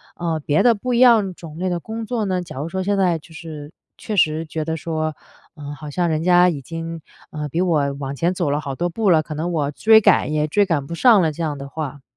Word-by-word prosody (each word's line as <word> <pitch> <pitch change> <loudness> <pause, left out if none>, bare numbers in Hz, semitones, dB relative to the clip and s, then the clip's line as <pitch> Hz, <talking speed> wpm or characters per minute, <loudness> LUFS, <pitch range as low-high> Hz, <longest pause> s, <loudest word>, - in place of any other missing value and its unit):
呃， 165 -2 -2
别 145 +1 +2
的 240 - +6
不 250 +4 -3
一 235 - +2
样 225 -7 +5
种 160 -3 -11
类 185 +1 -1
的 175 -1 -1
工 225 +5 -6
作 225 -1 -2
呢？ 185 -2 -1
假 170 -6 -10
如 145 +4 -3
说 190 +2 -3
现 200 +1 0
在 180 -3 +2
就 160 +2 -17
是 155 -2 -9 0.3
确 215 - -5
实 160 -3 +2
觉 155 0 -4
得 160 0 -2
说， 155 -1 -3 0.4
呃， 145 -2 -8
好 150 +1 -9
像 175 +4 0
人 155 0 -1
家 180 0 +5
已 150 -5 -4
经， 165 +2 -6 0.3
呃， 150 -1 -4
比 160 - -2
我 155 -6 +1
往 135 0 -4
前 170 +5 0
走 175 -5 -1
了 145 - 0
好 140 -3 -5
多 175 +5 -1
步 205 +4 0
了， 160 -3 +5
可 155 - -7
能 165 +4 -2
我 150 -4 -1
追 220 +8 +5
赶 175 - +3
也 150 0 +1
追 205 +7 +2
赶 160 -7 -1
不 170 - -6
上 225 +1 +5
了 160 - +1
这 155 - -8
样 150 -3 -2
的 140 0 -7
话。 145 -2 -6
165 Hz, 280 characters per minute, -21 LUFS, 150-185 Hz, 0.4 s, 的